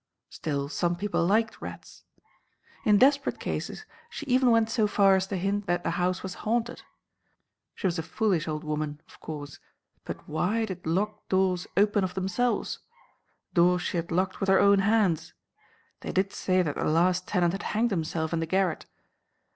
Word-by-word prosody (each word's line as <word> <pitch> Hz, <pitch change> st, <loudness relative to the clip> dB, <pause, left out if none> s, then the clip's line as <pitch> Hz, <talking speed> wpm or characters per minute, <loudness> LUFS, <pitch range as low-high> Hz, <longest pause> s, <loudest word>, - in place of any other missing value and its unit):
Still, 140 Hz, -3 st, -3 dB
some 175 Hz, +3 st, -1 dB
people 205 Hz, 0 st, -1 dB
liked 215 Hz, +5 st, +1 dB
rats. -, -, -10 dB, 0.8 s
In 210 Hz, -2 st, +5 dB
desperate 275 Hz, +4 st, +3 dB
cases 435 Hz, -, -4 dB, 0.2 s
she 390 Hz, -10 st, -7 dB
even 255 Hz, -1 st, +3 dB
went 230 Hz, -1 st, +4 dB
so 220 Hz, -3 st, +2 dB
far 200 Hz, -2 st, +4 dB
as 190 Hz, 0 st, 0 dB
to 195 Hz, -, -3 dB
hint 200 Hz, +2 st, -1 dB
that 175 Hz, 0 st, 0 dB
the -, -, 0 dB
house 180 Hz, +1 st, -1 dB
was 190 Hz, -1 st, -4 dB
haunted. 235 Hz, +2 st, -1 dB, 0.9 s
She -, -, -6 dB
was 175 Hz, -2 st, +1 dB
a -, -, 0 dB
foolish 180 Hz, -2 st, 0 dB
old 155 Hz, -1 st, -3 dB
woman, 150 Hz, -1 st, -3 dB
of -, -, -18 dB
course, 145 Hz, -2 st, -7 dB, 0.4 s
but -, -, -8 dB
why 195 Hz, +9 st, 0 dB
did 185 Hz, -5 st, -7 dB
locked 210 Hz, +5 st, -2 dB
doors 185 Hz, -2 st, +1 dB
open 205 Hz, 0 st, +3 dB
of 180 Hz, -1 st, -3 dB
themselves? 195 Hz, +6 st, -1 dB, 0.7 s
Doors 175 Hz, 0 st, +3 dB
she -, -, -2 dB
had 170 Hz, 0 st, -3 dB
locked 185 Hz, +2 st, 0 dB
with 195 Hz, -, -1 dB
her 190 Hz, -, +6 dB
own 200 Hz, 0 st, +5 dB
hands. 195 Hz, -6 st, +1 dB, 0.6 s
They -, -, -5 dB
did 195 Hz, +1 st, 0 dB
say 185 Hz, -1 st, +1 dB
that 150 Hz, -4 st, -2 dB
the -, -, -1 dB
last 180 Hz, +3 st, +2 dB
tenant 175 Hz, -3 st, +1 dB
had 195 Hz, -, -4 dB, 0.2 s
hanged 235 Hz, +1 st, +2 dB
himself 160 Hz, -2 st, -2 dB
in 165 Hz, -, +1 dB
the 165 Hz, -, -2 dB
garret. 185 Hz, -1 st, 0 dB
185 Hz, 180 wpm, -27 LUFS, 170-210 Hz, 0.9 s, her